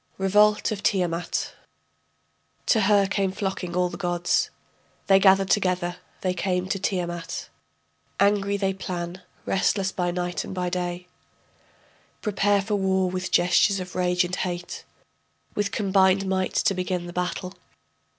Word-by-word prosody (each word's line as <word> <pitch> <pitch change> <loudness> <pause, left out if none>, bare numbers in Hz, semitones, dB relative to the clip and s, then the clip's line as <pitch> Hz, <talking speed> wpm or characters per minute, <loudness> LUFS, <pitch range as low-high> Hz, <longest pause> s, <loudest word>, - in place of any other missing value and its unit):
REVOLT 210 +3 +3
OF 205 -2 -3
TIAMAT 175 -4 -1 1.1
To 220 - +3
her 200 0 +4
came 195 -1 0
flocking 190 -3 -4
all 180 0 +2
the - - -7
gods, 175 -2 0 0.6
They 195 -1 +5
gathered 195 0 +4
together, 180 -3 +1 0.2
they 185 -1 0
came 180 0 -1
to 195 - -1
Tiamat; 175 -3 -3 0.7
Angry 200 0 +2
they 195 -1 0
plan, 180 -1 -5 0.2
restless 195 0 +1
by 180 -2 -1
night 175 0 -2
and - - -7
by 180 -1 -2
day, 180 0 -3 1.2
Prepare 205 -1 +2
for 210 +1 -1
war 190 -1 +1
with 185 0 -3
gestures 185 +3 +3
of 180 -1 -7
rage 180 0 +2
and 180 +1 -3
hate, 175 -1 -4 0.7
With 205 -1 -1
combined 195 -2 +3
might 190 -1 -1
to 210 - +3
begin 180 -1 -2
the 175 - -8
battle. 180 +1 -3
185 Hz, 140 wpm, -25 LUFS, 180-195 Hz, 1.2 s, They